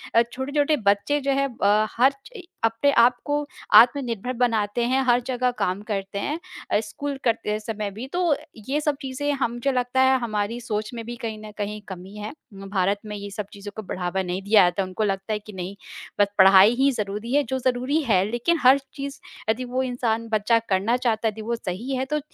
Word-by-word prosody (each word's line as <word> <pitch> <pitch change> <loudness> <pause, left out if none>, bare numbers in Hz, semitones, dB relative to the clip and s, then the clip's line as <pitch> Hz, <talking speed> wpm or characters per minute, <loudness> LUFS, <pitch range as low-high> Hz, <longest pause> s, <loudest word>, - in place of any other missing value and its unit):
अ, 230 - +7
छोटे-छोटे 285 +4 0
बच्चे 205 +9 +3
जो 275 0 0
हैं 275 0 +2 0.2
अ, 210 +2 +4
हर 260 +3 +5
चइ 465 -6 -11 0.2
अपने 225 +5 +2
आप 240 +1 +6
को 290 0 0 0.3
आत्मनिर्भर 245 -1 +5
बनाते 230 -2 0
हैं, 265 +1 +3
हर 245 -1 +4
जगह 250 -1 +1
काम 185 +2 0
करते 200 -1 -3
हैं 300 +10 -2 0.3
अ, - - +4
स्कूल 275 +6 -5
करते 215 -2 0
समय 215 -2 -4
भी। 225 +6 -7
तो 350 -4 +2 0.3
ये 290 +2 +1
सब 295 -1 0
चीज़ें 275 +2 -2
हम 240 -1 -1
जो 275 - +4
लगता 250 0 +1
है, 260 0 +5
हमारी 220 -1 -2
सोच 215 0 -3
में 230 -1 -5
भी 240 +1 -6
कहीं 220 -1 -4
न 210 - -9
कहीं 210 0 -4
कमी 190 +1 -9
है। 210 +3 -6 0.2
म 195 0 -9
भारत 195 +1 +1
में 210 0 -5
ये 205 0 -6
सब 210 0 -4
चीज़ों 205 0 -8
को 220 - -5
बढ़ावा 185 +1 -2
नहीं 180 +1 -3
दिया 205 0 +6
जाता, 180 +2 +1
उनको 185 +3 -3
लगता 195 +1 -1
है 210 - -1
कि 210 0 -12
नहीं, 185 +1 -6 0.4
बस 205 - +5
पढ़ाई 195 +3 +8
ही 270 +2 +3
ज़रूरी 210 0 -4
है, 290 +1 +4
जो 265 -1 -3
ज़रूरी 255 +5 0
है, 195 -8 +3
लेकिन 315 +8 +1
हर 260 +2 +8 0.2
चीज़ 280 -1 -6 0.3
यदि 225 +3 +1
वो 255 +1 -1
इंसान 235 -3 -1
बच्चा 220 +1 +3
करना 200 +5 +2
चाहता 230 -3 0
है, - - +1
यदि 220 +1 -9
वो 235 +2 -2
सही 230 +5 -4
है, 260 +1 -1
तो 300 +3 -1
230 Hz, 215 wpm, -24 LUFS, 205-260 Hz, 0.4 s, पढ़ाई